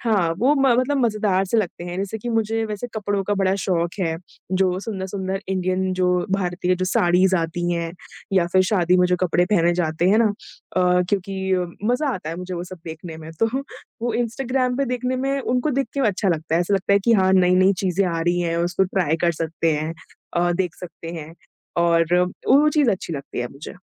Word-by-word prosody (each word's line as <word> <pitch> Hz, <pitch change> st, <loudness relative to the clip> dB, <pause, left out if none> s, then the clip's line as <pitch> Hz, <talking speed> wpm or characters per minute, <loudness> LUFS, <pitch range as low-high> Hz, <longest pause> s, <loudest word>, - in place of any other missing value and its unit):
हाँ, 200 Hz, -8 st, +1 dB
वो 260 Hz, +7 st, +4 dB
म 275 Hz, -2 st, +2 dB
मतलब 280 Hz, +3 st, +1 dB
मज़ेदार 210 Hz, -6 st, +1 dB
से 195 Hz, +4 st, -1 dB
लगते 175 Hz, -4 st, -3 dB
हैं। 175 Hz, 0 st, -5 dB
जैसे 200 Hz, +3 st, -3 dB
कि 240 Hz, -, -6 dB
मुझे 225 Hz, 0 st, 0 dB
वैसे 210 Hz, +2 st, -4 dB
कपड़ों 205 Hz, -2 st, -1 dB
का 205 Hz, -, 0 dB
बड़ा 195 Hz, -1 st, +1 dB
शौक 170 Hz, -2 st, 0 dB
है, 165 Hz, -3 st, 0 dB, 0.4 s
जो 185 Hz, -1 st, +2 dB
सुंदर-सुंदर 190 Hz, -2 st, -4 dB
इंडियन 185 Hz, 0 st, 0 dB
जो 185 Hz, 0 st, +1 dB, 0.2 s
भारतीय 180 Hz, -1 st, 0 dB
जो 185 Hz, +1 st, -2 dB
साड़ीज़ 185 Hz, +1 st, +3 dB
आती 175 Hz, +1 st, -1 dB
हैं 170 Hz, -1 st, -2 dB, 0.4 s
या 185 Hz, -3 st, +3 dB
फिर 185 Hz, 0 st, +5 dB
शादी 180 Hz, -3 st, +3 dB
में 180 Hz, 0 st, +4 dB
जो 180 Hz, -, +1 dB
कपड़े 175 Hz, -1 st, +2 dB
पहने 175 Hz, -4 st, +3 dB
जाते 170 Hz, 0 st, 0 dB
हैं 210 Hz, +3 st, +4 dB
ना? 220 Hz, -3 st, +3 dB, 0.4 s
अ, 180 Hz, 0 st, +4 dB
क्योंकि 190 Hz, -1 st, -1 dB, 0.3 s
मज़ा 250 Hz, +5 st, +1 dB
आता 160 Hz, -4 st, -5 dB
है 165 Hz, -, -5 dB
मुझे 180 Hz, +1 st, -5 dB
वो 175 Hz, 0 st, -4 dB
सब 185 Hz, 0 st, -10 dB
देखने 160 Hz, 0 st, -7 dB
में 160 Hz, 0 st, -9 dB
तो 225 Hz, -, +5 dB, 0.6 s
वो 240 Hz, -1 st, 0 dB
इंस्टाग्राम 250 Hz, +2 st, -1 dB
पे 275 Hz, -, +1 dB
देखने 250 Hz, 0 st, -2 dB
में 275 Hz, +2 st, -1 dB
उनको 250 Hz, +3 st, 0 dB
देख 275 Hz, -1 st, 0 dB
के 280 Hz, -, -1 dB
अच्छा 200 Hz, 0 st, -1 dB
लगता 160 Hz, -1 st, -1 dB
है। 170 Hz, -, +3 dB
ऐसा 185 Hz, +3 st, +1 dB
लगता 195 Hz, +1 st, +1 dB
है 200 Hz, -, +6 dB
कि 235 Hz, -, +4 dB
हाँ, 190 Hz, -3 st, +4 dB
नई-नई 185 Hz, +1 st, +5 dB
चीज़ें 190 Hz, +1 st, +1 dB
आ 165 Hz, -1 st, -1 dB
रही 175 Hz, +1 st, +1 dB
हैं, 170 Hz, -1 st, -1 dB
उसको 175 Hz, +3 st, +1 dB
ट्राई 180 Hz, -4 st, 0 dB
कर 170 Hz, -, +3 dB
सकते 165 Hz, 0 st, 0 dB
हैं। 155 Hz, +2 st, -2 dB, 0.4 s
अ, 175 Hz, 0 st, +2 dB
देख 180 Hz, -1 st, -1 dB
सकते 165 Hz, -2 st, -8 dB
हैं 155 Hz, +2 st, -10 dB, 0.4 s
और 170 Hz, -1 st, +3 dB, 0.2 s
और 180 Hz, -, +4 dB, 0.2 s
वो 290 Hz, +4 st, +6 dB
चीज़ 295 Hz, -5 st, +3 dB
अच्छी 185 Hz, -4 st, -3 dB
लगती 140 Hz, -2 st, -6 dB
है 120 Hz, -, -1 dB
मुझे। 140 Hz, +7 st, -9 dB
185 Hz, 215 wpm, -22 LUFS, 175-215 Hz, 0.6 s, है